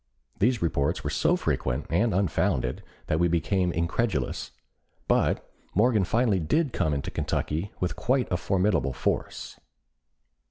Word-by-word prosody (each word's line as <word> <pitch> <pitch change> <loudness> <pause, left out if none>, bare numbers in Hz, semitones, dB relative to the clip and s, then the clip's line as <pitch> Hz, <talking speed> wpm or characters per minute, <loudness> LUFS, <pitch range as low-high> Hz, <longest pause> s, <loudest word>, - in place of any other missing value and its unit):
These 115 0 +2
reports 70 -4 0
were - - -2
so - - +2
frequent 65 +3 -1
and 105 +8 +2
unfounded 90 -9 0 0.2
that 80 - 0
we 85 - +4
became 90 +2 +1
incredulous, 85 - -1 0.6
but - - +1 0.3
Morgan 110 -1 +3
finally 110 -2 +2
did 135 - +1
come 80 -5 +1
into 70 - -3
Kentucky 80 +7 -2
with 90 - -1
quite 130 +1 +1
a 90 - +2
formidable 90 -6 +1
force. - - -3
90 Hz, 130 wpm, -27 LUFS, 80-105 Hz, 0.6 s, we